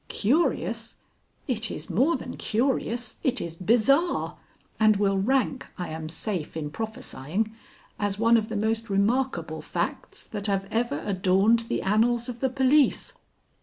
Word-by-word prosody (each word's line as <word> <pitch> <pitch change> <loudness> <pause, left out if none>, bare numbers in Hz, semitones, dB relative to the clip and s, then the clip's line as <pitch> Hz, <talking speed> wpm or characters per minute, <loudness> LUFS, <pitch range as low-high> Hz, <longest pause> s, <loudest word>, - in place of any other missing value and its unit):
"Curious? 285 +12 0 0.5
It 225 -5 -1
is - - -6
more 255 - +2
than - - -6
curious; 240 0 -1
it 260 -3 +1
is 165 -1 -5
bizarre, 245 - +2 0.4
and 215 -1 +5
will 195 -1 +2
rank, 260 +4 +1
I 180 - -4
am 155 0 -5
safe 165 -1 -3
in 150 -2 -4
prophesying, 215 0 -3 0.5
as 205 -1 -1
one 230 +2 +4
of 220 -1 +1
the 220 - -2
most 225 +2 -1
remarkable 235 +7 0
facts - - -4
that 205 -1 -4
have 195 -1 0
ever 225 -10 -1
adorned 195 +4 +3
the - - -1
annals 230 +4 +2
of 245 -1 -6
the 265 - +1
police. 265 +3 +3
220 Hz, 145 wpm, -26 LUFS, 195-245 Hz, 0.5 s, and